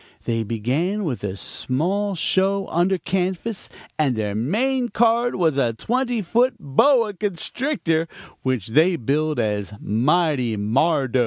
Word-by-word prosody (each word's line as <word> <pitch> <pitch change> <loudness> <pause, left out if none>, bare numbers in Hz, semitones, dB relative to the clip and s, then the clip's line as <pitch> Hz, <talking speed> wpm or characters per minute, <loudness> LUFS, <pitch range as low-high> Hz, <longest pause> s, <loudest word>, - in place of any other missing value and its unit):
They 115 -1 -1
began 130 - -1
with 135 - -3
a 95 -2 -3
small 185 - -2
show 195 +3 +1
under 180 +3 +2
canvas, 190 +4 -2 0.3
and 140 -5 +2
their 105 -2 -2
main 240 - 0
card 235 +1 +2
was 160 -6 +1
a 120 -4 +2
twenty 240 - -1
foot 240 +8 +2
boa 225 - +3
constrictor, 195 - -1 0.3
which 130 -6 -2
they 160 +9 +4
billed 150 +2 0
as 105 -2 -1
'Mighty 130 0 +1
Mardo.' 130 +5 +1
165 Hz, 130 wpm, -22 LUFS, 125-205 Hz, 0.3 s, they